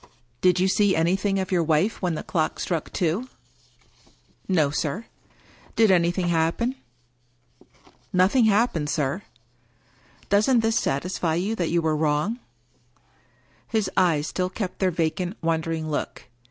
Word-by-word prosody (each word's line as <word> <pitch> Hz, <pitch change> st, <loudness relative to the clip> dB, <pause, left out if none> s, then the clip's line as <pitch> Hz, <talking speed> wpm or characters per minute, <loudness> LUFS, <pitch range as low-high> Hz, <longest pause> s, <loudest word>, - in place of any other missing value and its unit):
" 120 Hz, 0 st, -41 dB
Did 180 Hz, -1 st, +4 dB
you 185 Hz, -, +3 dB
see 200 Hz, 0 st, +3 dB
anjrthing 190 Hz, +4 st, +1 dB
of 190 Hz, 0 st, -3 dB
your 180 Hz, -2 st, +3 dB
wife 165 Hz, +7 st, +1 dB
when 180 Hz, -3 st, 0 dB
the -, -, -5 dB
clock 160 Hz, -3 st, -1 dB
struck 170 Hz, -4 st, -3 dB
two? 185 Hz, +9 st, -1 dB, 0.4 s
" -, -, -33 dB
" -, -, -34 dB, 0.3 s
No, 160 Hz, -7 st, +2 dB
sir." 165 Hz, +9 st, -2 dB, 0.3 s
" -, -, -28 dB
Did 220 Hz, -3 st, +5 dB
anything 175 Hz, 0 st, +2 dB
happen? 170 Hz, +9 st, +1 dB, 0.5 s
" 120 Hz, 0 st, -32 dB
" -, -, -32 dB, 0.3 s
Nothing 195 Hz, +7 st, +4 dB
happened, 205 Hz, -8 st, +2 dB
sir." 145 Hz, +4 st, -1 dB, 0.5 s
" 125 Hz, +1 st, -31 dB
Doesn't 220 Hz, +4 st, +4 dB
this 225 Hz, +1 st, +1 dB
satisfy 160 Hz, +3 st, -1 dB
you 195 Hz, +6 st, -1 dB
that 175 Hz, -6 st, -1 dB
you 170 Hz, 0 st, +1 dB
were 155 Hz, -1 st, +1 dB
wrong? 155 Hz, +9 st, 0 dB, 0.6 s
" -, -, -37 dB, 0.5 s
His 215 Hz, -4 st, -1 dB
eyes 165 Hz, -5 st, +2 dB
still 180 Hz, +2 st, -2 dB
kept 185 Hz, -1 st, -5 dB
their 190 Hz, -, +2 dB
vacant, 175 Hz, +3 st, -2 dB
wondering 160 Hz, -1 st, -1 dB
look. 145 Hz, -, -4 dB
175 Hz, 160 wpm, -24 LUFS, 160-195 Hz, 0.6 s, Did